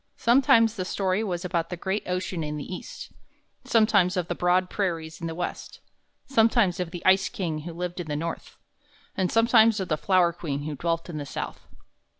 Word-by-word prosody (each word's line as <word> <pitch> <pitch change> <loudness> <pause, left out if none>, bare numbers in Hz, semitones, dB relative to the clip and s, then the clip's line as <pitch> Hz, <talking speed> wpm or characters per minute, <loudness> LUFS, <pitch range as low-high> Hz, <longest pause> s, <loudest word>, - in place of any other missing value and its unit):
Sometimes 230 -2 +4
the 185 - -1
story 190 +2 -1
was 180 -3 -3
about 170 -2 -1
the 180 - -5
great 190 +4 -2
ocean 180 -2 -2
in 150 0 -4
the 145 - -5
East, 180 - -8 0.5
sometimes 205 -5 +3
of 175 -2 -2
the - - 0
broad 180 +1 +2
prairies 165 -5 -3
in 165 - -3
the 165 - -5
West, 175 +1 -5 0.5
sometimes 225 -7 +3
of 180 -2 -2
the 175 0 -8
ice 190 0 +4
king 165 -5 -3
who 165 +3 -7
lived 180 +1 -5
in 175 - -5
the 150 - -2
North, 165 +2 -5 0.6
and 185 -2 0
sometimes 225 -1 +5
of 190 - -4
the 155 - +1
flower 180 -1 +3
queen 145 -5 -4
who 150 0 -4
dwelt 165 +3 -2
in 160 -4 -5
the - - -4
South. - - -6
180 Hz, 195 wpm, -26 LUFS, 165-195 Hz, 0.6 s, sometimes